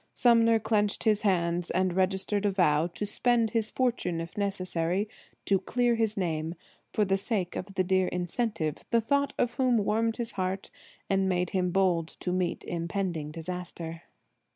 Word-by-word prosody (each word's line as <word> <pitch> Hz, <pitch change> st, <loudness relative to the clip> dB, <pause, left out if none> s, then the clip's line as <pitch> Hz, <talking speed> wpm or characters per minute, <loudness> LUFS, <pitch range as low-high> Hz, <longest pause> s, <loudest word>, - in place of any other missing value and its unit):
Sumner 230 Hz, -2 st, +5 dB
clenched 210 Hz, -2 st, 0 dB
his 215 Hz, -2 st, +3 dB
hands 175 Hz, -3 st, +1 dB
and 185 Hz, 0 st, +1 dB
registered 190 Hz, +2 st, +1 dB
a -, -, +3 dB
vow 165 Hz, -5 st, +3 dB
to 180 Hz, +4 st, -5 dB
spend 230 Hz, +1 st, +2 dB
his 225 Hz, -2 st, +1 dB
fortune, 235 Hz, -10 st, 0 dB
if 165 Hz, +1 st, -6 dB
necessary, 190 Hz, -1 st, -1 dB, 0.4 s
to 195 Hz, -1 st, +3 dB
clear 240 Hz, +5 st, +1 dB
his 225 Hz, -2 st, 0 dB
name, 165 Hz, -2 st, -1 dB, 0.4 s
for 210 Hz, -, +2 dB
the 195 Hz, 0 st, +1 dB
sake 195 Hz, -4 st, -1 dB
of 195 Hz, +1 st, -6 dB
the 185 Hz, -, +2 dB
dear 185 Hz, 0 st, +2 dB
incentive, 180 Hz, -, -2 dB
the 235 Hz, -, +4 dB
thought 280 Hz, +5 st, +1 dB
of 240 Hz, -, +1 dB
whom 255 Hz, -3 st, +2 dB
warmed 225 Hz, +2 st, +1 dB
his 235 Hz, -1 st, -2 dB
heart 190 Hz, 0 st, -3 dB, 0.4 s
and 195 Hz, -1 st, +2 dB
made 180 Hz, -1 st, 0 dB
him 185 Hz, -3 st, +1 dB
bold 175 Hz, -3 st, +2 dB
to 180 Hz, -, -1 dB
meet 180 Hz, -1 st, -1 dB
impending 170 Hz, -2 st, -3 dB
disaster. 165 Hz, 0 st, -6 dB
190 Hz, 165 wpm, -28 LUFS, 175-220 Hz, 0.4 s, Sumner